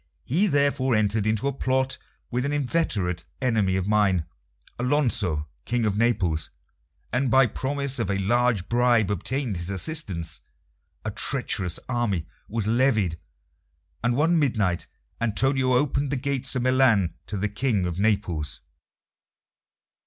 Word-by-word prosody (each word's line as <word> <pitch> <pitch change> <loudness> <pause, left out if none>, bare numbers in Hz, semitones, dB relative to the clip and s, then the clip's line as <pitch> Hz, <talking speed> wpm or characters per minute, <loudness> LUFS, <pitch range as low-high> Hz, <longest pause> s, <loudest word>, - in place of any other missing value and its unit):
He 180 +11 +2
therefore 140 - +2
entered 110 0 +1
into 110 +4 0
a 140 - 0
plot 130 0 0 0.3
with 125 +1 0
an 140 - -1
inveterate 120 - 0 0.2
enemy 110 -7 +1
of 95 0 -1
mine, 100 -6 +2 0.5
Alonso, 120 - +1 0.2
King 120 -1 0
of 105 -2 +1
Naples, 100 -9 +1 0.6
and 130 +1 +1
by 135 +2 +6
promise 135 +3 -2
of 115 - -1
a 100 - +1
large 115 0 +1
bribe 120 -3 +3
obtained 115 - -2
his 85 +2 -4
assistance. 95 - -2 0.6
A - - -1
treacherous 90 -2 -1
army 115 -9 -1 0.2
was 110 -1 -2
levied, 110 -8 +2 0.8
and 120 0 +2
one 165 +4 +3
midnight 110 - 0 0.3
Antonio 130 +3 +2
opened 140 +2 +1
the - - +1
gates 135 -1 -1
of 125 - 0
Milan 125 -8 +3
to 105 - -4
the 100 +2 0
King 105 -2 0
of 90 0 -3
Naples. 90 -8 0
115 Hz, 135 wpm, -25 LUFS, 100-130 Hz, 0.8 s, by